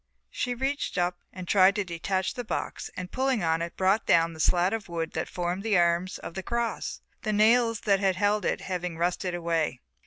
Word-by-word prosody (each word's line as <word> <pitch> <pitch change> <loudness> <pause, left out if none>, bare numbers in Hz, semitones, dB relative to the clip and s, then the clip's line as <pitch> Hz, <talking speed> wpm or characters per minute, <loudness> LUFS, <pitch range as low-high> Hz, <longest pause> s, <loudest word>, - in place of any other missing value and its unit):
She 245 -1 -2
reached 270 0 -2
up 175 0 0
and 185 -1 -8
tried 195 +1 +5
to 205 - 0
detach 185 +2 -2
the 245 - -5
box 215 - -4
and 180 0 -5
pulling 260 -6 0
on 165 0 +1
it 170 0 -5
brought 195 +3 +2
down 165 0 +4
the 160 - -12
slat 175 +4 +3
of 220 -4 -4
wood 165 -1 -3
that - - -3
formed 180 +1 -2
the 210 -2 +2
arms 175 +1 +2
of - - -8
the 190 - -4
cross, 235 +3 -3 0.2
the 215 - -1
nails 230 +1 +4
that 200 -2 +3
had 190 -1 +2
held 205 +2 +1
it - - 0
having 180 -3 -4
rusted 175 +1 -1
away. 165 -6 -1
185 Hz, 210 wpm, -27 LUFS, 175-215 Hz, 0.2 s, tried